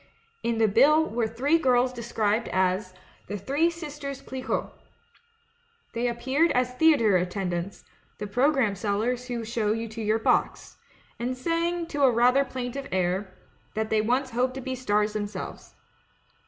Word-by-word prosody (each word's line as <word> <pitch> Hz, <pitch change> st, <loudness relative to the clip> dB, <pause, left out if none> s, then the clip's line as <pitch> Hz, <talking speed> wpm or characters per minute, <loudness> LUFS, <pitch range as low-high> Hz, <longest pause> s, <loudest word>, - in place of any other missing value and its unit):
"In 235 Hz, -1 st, -1 dB
the 225 Hz, -1 st, +4 dB
bill 305 Hz, +9 st, +5 dB
were 230 Hz, -5 st, -1 dB
three 270 Hz, +9 st, +1 dB
girls 255 Hz, -3 st, +3 dB
described 225 Hz, -2 st, -1 dB
as 185 Hz, 0 st, 0 dB, 0.3 s
'The 205 Hz, -, -4 dB
Three 280 Hz, -, +1 dB
Sisters 295 Hz, -5 st, -6 dB
Clicquot.' 260 Hz, -1 st, -4 dB, 1.2 s
They 235 Hz, +1 st, 0 dB
appeared 265 Hz, +7 st, +1 dB
as 250 Hz, 0 st, +1 dB
thea 320 Hz, +3 st, +5 dB
tre 210 Hz, -7 st, +3 dB
attendants 180 Hz, 0 st, -3 dB, 0.2 s
— -, -, -37 dB
the 210 Hz, -, -5 dB
programme 245 Hz, +1 st, +2 dB
sellers 220 Hz, +5 st, -1 dB
who 235 Hz, -2 st, -3 dB
show 220 Hz, -2 st, 0 dB
you 225 Hz, +1 st, -3 dB
to 225 Hz, +1 st, -7 dB
your 215 Hz, +1 st, +2 dB
box 225 Hz, -, 0 dB, 0.2 s
— -, -, -32 dB
and 250 Hz, +2 st, -2 dB
sang, 335 Hz, +4 st, -1 dB
to 290 Hz, -3 st, -4 dB
a 270 Hz, -, +7 dB
rather 250 Hz, +3 st, +4 dB
plaintive 260 Hz, +1 st, -5 dB
air, 185 Hz, +1 st, 0 dB, 0.4 s
that 220 Hz, 0 st, -2 dB
they 215 Hz, -1 st, +3 dB
once 255 Hz, +4 st, 0 dB
hoped 250 Hz, +2 st, 0 dB
to 265 Hz, -, -5 dB
be 260 Hz, +1 st, -4 dB
stars 210 Hz, -4 st, 0 dB
themselves. 205 Hz, -1 st, -6 dB
240 Hz, 160 wpm, -26 LUFS, 210-270 Hz, 1.2 s, a